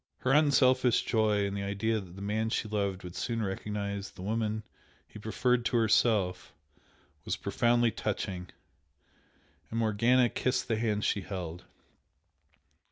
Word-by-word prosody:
Her 130 - +1
unselfish 130 -4 +4
joy 105 -3 +2
in 100 - -3
the 100 - -3
idea 100 +3 -1
that 90 -3 -11
the 100 - -8
man 110 +2 -1
she 110 - -1
loved 100 -3 -2
would 90 -1 -8
soon 115 -2 -2
recognise 100 0 -3
the 90 - -11
woman 110 +1 -1 0.4
he - - -12
preferred 120 +3 +1
to 120 - +2
herself, 110 -4 +2 0.7
was - - -2
profoundly 120 0 +2
touching, 95 -4 -3 1.2
and 115 - -4
Morgana 115 +3 +3
kissed 130 - -1
the 110 - 0
hand 105 -2 0
she 100 - +1
held. 90 -2 -6
110 Hz, 140 wpm, -30 LUFS, 100-115 Hz, 1.2 s, unselfish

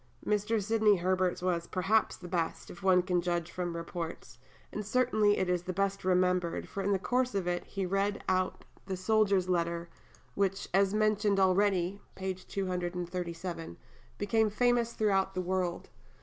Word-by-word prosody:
Mr. 210 +2 +1
Sidney 215 0 +3
Herbert's 185 0 0
was, 170 -2 0
perhaps, 195 +4 +1
the 180 - -9
best, 170 -2 -2
if 175 - -12
one 185 -2 +4
can 180 -1 +1
judge 175 -1 -2
from 180 -1 -3
the 170 - -5
reports; 165 0 -6 0.3
and 210 - -4
certainly 215 -2 +2
it 190 - 0
is 180 -1 +1
the 185 +1 -4
best 195 +1 -1
remembered, 180 -1 +1
for 200 - -4
in 200 +1 0
the 195 - +3
course 250 +4 0
of 195 -3 0
it 175 0 -1
he 195 -2 -3
read 195 +2 0
out 185 0 0 0.2
the 190 -1 -3
soldier's 200 -1 +2
letter, 170 -1 -1 0.4
which, 195 0 0
as 195 0 +4
mentioned 210 -1 +2
already 190 0 +2
(p. 190 0 -2
237), 180 - -4 0.4
became 215 +2 +2
famous 240 +1 +2
throughout 195 -3 +1
the - - -1
world. 180 -1 -2
190 Hz, 165 wpm, -31 LUFS, 180-205 Hz, 0.4 s, one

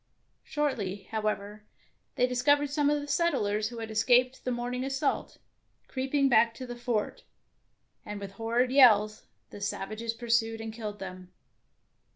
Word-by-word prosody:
Shortly, 210 -10 -2
however, 210 -1 -2 0.5
they 250 - +3
discovered 280 +3 +2
some 290 -1 +2
of 295 0 +2
the 290 - -7
settlers 215 -10 +1
who 240 - -9
had 225 -1 -5
escaped 250 +4 +3
the 255 - -1
morning 245 +1 -3
assault, 270 +1 -1 0.5
creeping 270 +1 +1
back 230 -2 +4
to 255 - -7
the 245 -1 -7
fort, 240 -3 -2 0.8
and 210 0 -6
with 200 -1 -7
horrid 235 +4 0
yells 215 -6 +5 0.2
the 205 - -10
savages 215 +3 -3
pursued 230 -1 0
and 225 0 -6
killed 215 -2 -6
them. 185 -2 -9
230 Hz, 145 wpm, -29 LUFS, 215-260 Hz, 0.8 s, yells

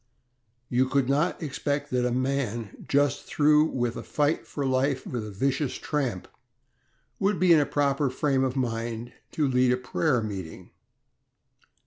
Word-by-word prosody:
You 130 +1 +1
could 140 -2 +2
not 150 +6 +1
expect 145 0 -2
that 125 -1 +1
a - - -1
man 125 -4 -2
just 140 -2 +2
through 150 +1 +4
with 120 -6 -2
a - - -5
fight 150 +1 0
for 145 - -3
life 130 +1 +1
with 120 -4 -4
a - - -6
vicious 135 +7 -1
tramp 130 -11 -2 0.9
would 195 -3 +1
be 180 -1 +6
in 160 - +6
a 145 - +1
proper 145 -1 +1
frame 135 0 +1
of 130 0 -1
mind 115 -2 -3 0.2
to 150 -3 +1
lead 125 -1 +3
a 125 - +2
prayer 125 0 0
meeting. 95 -6 -7
135 Hz, 155 wpm, -27 LUFS, 125-145 Hz, 0.9 s, be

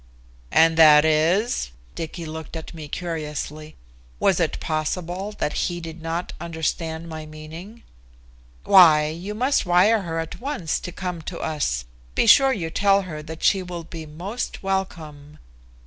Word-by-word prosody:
"And 165 0 +5
that 155 -1 +8
is?" 160 - +2 0.2
Dicky 165 +1 -6
looked 160 +1 -7
at 160 +1 -7
me 155 -2 -8
curiously. 155 -2 -5 0.4
Was - - +3
it - - 0
possible 175 +5 -3
that 150 - -2 0.2
he 175 0 -4
did 165 -1 -8
not 165 +2 -3
understand 160 0 -3
my 155 -1 -7
meaning? 160 +9 -10 0.8
"Why, 155 -5 +7
you 180 +6 -6
must 255 +5 +2
wire 195 +5 +4
her 165 -3 -4
at 165 +6 -5
once 265 - -2
to 180 - -7
come 180 -2 -5
to 175 - -7
us. 140 - -2 0.3
Be - - +3
sure 270 +4 +7
you 170 -10 -3
tell 200 +2 +3
her 155 -5 -7
that 160 +1 -9
she 195 - +4
will 175 -2 -6
be 165 -1 -9
most 185 +12 -5
welcome." 155 -6 -4
165 Hz, 150 wpm, -23 LUFS, 155-185 Hz, 0.8 s, that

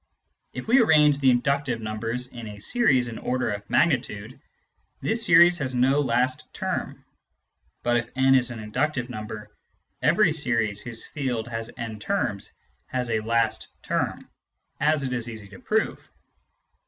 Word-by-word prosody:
If - - -7
we 250 +4 +5
arrange 150 -9 +5
the 135 -2 +4
inductive 130 0 +1
numbers 115 +3 -3
in 120 -3 -9
a 105 -1 -8
series 130 - +2
in 115 - -6
order 125 -2 -1
of 100 0 -6
magnitude, 125 -7 0 0.6
this 225 +1 0
series 175 -1 +6
has 130 -2 -2
no 130 +3 +3
last 125 0 0
term; - - -4 0.8
but 120 0 +2
if 120 0 -3
n 130 +1 +4
is 130 -1 +3
an 120 -2 -7
inductive 125 +4 -2
number, 110 -1 -7 0.5
every - - +4
series 115 -9 0
whose 115 -2 -6
field 125 -6 -3
has 115 0 -4
n 110 -2 -5
terms 145 - -2 0.4
has 125 -2 -2
a 110 - +1
last 115 0 0 0.2
term, - - -2 0.5
as 150 -1 +2
it 130 -1 -2
is 120 -1 -2
easy 110 -3 -9
to 100 - -13
prove. 220 +1 0
125 Hz, 155 wpm, -25 LUFS, 115-140 Hz, 0.8 s, series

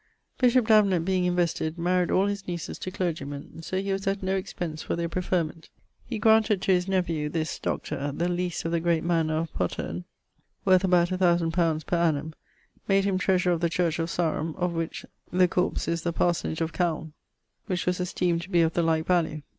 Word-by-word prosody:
Bishop 250 -1 +4
Davenant 200 -6 +4
being 185 -1 +1
invested, 170 -3 0
maried 180 +1 +1
all 190 - +3
his 200 -1 -3
nieces 175 -2 -5
to - - -4
clergie 170 -6 -2
men, 145 +3 -8
so 185 +3 -2
he 195 0 -2
was 195 0 -2
at 195 0 -1
no 190 +1 0
expence 175 -4 -4
for - - -2
their 170 0 -2
preferment. 170 -2 -2 0.4
He 235 - -3
granted 220 -2 +4
to - - +2
his 180 0 +2
nephew 170 -6 0
(this 160 0 -3
Dr.) 145 +1 -3
the 170 +5 -1
lease 175 -1 -2
of 165 - -1
the 170 - +1
great 165 -1 +1
mannour 165 -2 +1
of 160 0 -3
Poterne, 90 -1 -3 0.6
worth 185 -1 +5
about 180 -1 +3
1000 175 -3 +2
li. 165 -3 +2
per 175 - 0
annum; 160 -2 0 0.5
made 195 0 +3
him 190 -2 +1
threasurer 185 -2 +2
of 170 - -2
the 170 - +2
church 165 0 0
of 165 +1 -1
Sarum, 165 -2 -1
of 180 -1 -1
which 165 0 -4 0.3
the 180 0 +4
corps 180 +1 -1
is 170 0 -1
the 170 - -1
parsonage 165 -1 0
of 165 0 -1
Calne, 160 -3 -1 0.5
which 185 -4 -1
was 180 0 0
esteemed 180 -1 0
to 175 - -9
be 175 -3 +3
of 160 0 +2
the 175 - +1
like 160 -1 +1
value. 160 -4 +1
175 Hz, 205 wpm, -26 LUFS, 165-185 Hz, 0.6 s, worth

